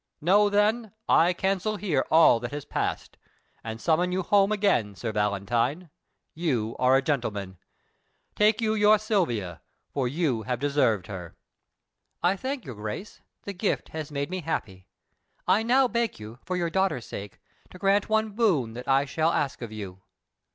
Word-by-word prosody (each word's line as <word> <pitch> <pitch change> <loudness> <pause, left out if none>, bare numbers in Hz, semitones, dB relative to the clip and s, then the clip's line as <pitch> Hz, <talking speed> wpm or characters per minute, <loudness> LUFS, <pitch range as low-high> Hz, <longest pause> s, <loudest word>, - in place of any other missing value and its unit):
Know, 205 +6 +4
then, 210 +2 +1
I 170 +2 +5
cancel 195 +3 -1
here 175 -10 0
all 160 -7 +6
that 120 0 -5
has 145 -1 -6
passed, - - -3 0.5
and 110 0 -6
summon 170 +6 +1
you 185 +1 -1
home 200 +2 +3
again 195 - +1
Sir 115 +3 -4
Valentine, 115 - -1 0.4
you 125 -10 -1
are 130 +1 +4
a 135 - 0
gentleman. 105 - -2 0.8
Take 215 +1 +3
you 220 -1 +1
your 210 0 +5
Silvia, 125 - -1 0.3
for 135 -3 0
you 140 -4 0
have 125 +3 -2
deserved 140 -8 +1
her." 90 -4 -8 0.9
"I 180 +3 +3
thank 260 +3 -4
your 130 - -6
Grace; 110 - -7 0.2
the 200 - -5
gift 195 +2 -2
has 155 -2 -6
made 140 +3 -3
me 185 0 -3
happy. 95 - -4 0.6
I 210 - +4
now 255 +3 +4
beg 235 - -1
you, 110 +3 -10
for 180 +1 -2
your 170 -2 -1
daughter's 190 -10 0
sake, 100 0 -8 0.3
to - - -12
grant 200 +2 +2
one 220 0 +1
boon 185 - +1
that 125 +3 -8
I 135 +1 +3
shall 160 +3 +1
ask 140 -6 -1
of 115 -2 -6
you." 95 -3 -8
155 Hz, 165 wpm, -26 LUFS, -, 0.9 s, all